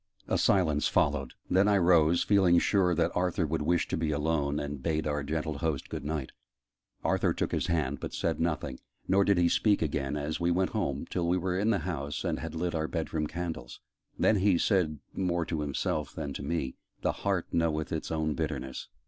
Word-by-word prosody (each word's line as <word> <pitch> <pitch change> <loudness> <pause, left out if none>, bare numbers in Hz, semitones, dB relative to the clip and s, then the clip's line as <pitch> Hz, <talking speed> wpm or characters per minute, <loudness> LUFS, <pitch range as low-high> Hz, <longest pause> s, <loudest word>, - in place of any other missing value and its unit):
A - - +1
silence 80 -6 +3
followed: 70 -2 +1
then 95 +2 +3
I 105 -1 +4
rose, 85 -2 +4
feeling 95 -4 +4
sure 90 -1 +3
that 85 0 +1
Arthur 90 -1 +1
would 80 +1 -1
wish 85 +3 +1
to - - 0
be 80 -1 -1
alone, 75 -1 0
and 70 -1 -5
bade 80 +1 -1
our 75 -1 -1
gentle 75 0 -3
host 80 -5 -2
'Good - - -5
night': 75 -2 -3 0.7
Arthur - - +1
took - - -1
his - - 0
hand, 75 -5 0
but - - -5
said - - -1
nothing: 75 -6 -1 0.3
nor 100 +1 +4
did 100 -1 +3
he 85 -1 +4
speak 105 +3 +3
again, 75 -2 -1
as 75 +2 -3
we 85 0 +1
went 90 +2 +1
home 85 -9 -2
till 85 -2 -1
we 90 +2 +2
were 90 0 -1
in 100 +4 +1
the 110 - +3
house 75 -5 -3
and - - -1
had - - -6
lit 85 +1 -1
our 80 -1 -1
bed 80 -1 -3
room 75 -2 0
candles. 80 -7 -5 0.4
Then 105 - +4
he 95 -2 +3
said 85 -6 +1 0.2
more 85 -3 0
to 80 -2 -2
himself 75 +1 -2
than 75 -3 -4
to - - -5
me, 70 -3 -2 0.3
"The - - +2
heart 95 -4 0
knoweth 80 -2 0
its 80 - -3
own 80 -1 0
bitterness. 70 -5 -4
80 Hz, 210 wpm, -29 LUFS, 75-90 Hz, 0.7 s, I